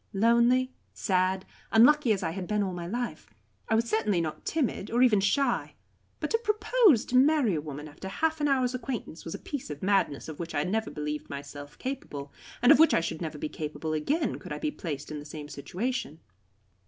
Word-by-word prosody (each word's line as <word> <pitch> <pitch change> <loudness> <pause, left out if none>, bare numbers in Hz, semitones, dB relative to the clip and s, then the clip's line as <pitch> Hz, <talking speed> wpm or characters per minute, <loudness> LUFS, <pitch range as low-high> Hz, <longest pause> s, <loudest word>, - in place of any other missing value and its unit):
Lonely, 235 +5 +3 0.2
sad, 185 0 +1 0.3
unlucky 245 +3 +6
as 200 -2 +1
I 165 - -1
had 180 +1 -5
been 210 -1 +1
all 190 -2 -2
my 175 -1 -5
life, 235 -5 -4 0.4
I 220 - +3
was 230 +1 +2
certainly 215 -4 +1
not 160 -2 -4
timid, 265 -10 -1
nor 240 +2 +3
even 225 -5 +5
shy. 240 +5 +1 0.4
But - - -3
to 455 - +3
propose 430 - +3
to 255 - -3
marry 270 - +4
a 155 - -1
woman 150 0 -7
after 150 +5 -9
half 315 +9 -1
an 295 - +3
hour's 260 -3 +2
acquaintance 250 - -5
was 165 - -5
a - - -4
piece 285 - -6
of 150 +2 -7
madness 190 -7 +1
of 155 -2 -8
which 170 -1 -5
I 145 - +2
never 220 +5 -1
believed 150 0 -4
myself 145 +1 -8
capable, 150 - -5 0.3
and 245 - +8
of 305 - +7
which 320 - +6
I - - +4
should 165 0 -4
never 155 -2 -4
be 150 - -3
capable 155 +1 -4
again, 280 - 0
could - - -10
I - - -2
be 305 - -2
placed 150 - -6
in 150 - -4
the - - -8
same 150 0 -8
situation. 175 - -4
200 Hz, 210 wpm, -28 LUFS, 155-255 Hz, 0.4 s, and